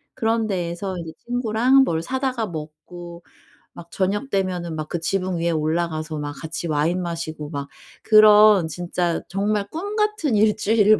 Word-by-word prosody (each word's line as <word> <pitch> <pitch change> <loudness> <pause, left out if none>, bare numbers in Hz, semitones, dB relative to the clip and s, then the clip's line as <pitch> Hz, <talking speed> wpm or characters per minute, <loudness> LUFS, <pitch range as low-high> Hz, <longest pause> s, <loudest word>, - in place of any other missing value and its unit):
그런 225 0 0
데에서 180 0 -3
인제 165 -2 -6 0.2
친구랑 245 +2 +3
뭘 165 -10 -1
사다가 260 +1 -2
먹고 170 +2 -9 0.5
막 170 0 -12
저녁 205 +7 -1
되면은 180 -4 -1
막 155 -1 -4
그 175 - -2
지붕 185 +1 -1
위에 170 +1 0
올라가서 155 0 -1
막 145 0 -4
같이 160 +3 -6
와인 160 +4 0
마시고 160 -3 -5
막 140 -2 -5 0.3
그런 215 -4 +7
진짜 175 +1 -2
정말 200 +1 -1
꿈 400 +6 -5
같은 425 - +1
1 210 0 +4
주일을 215 0 +4
180 Hz, 290 characters per minute, -22 LUFS, 165-215 Hz, 0.5 s, 그런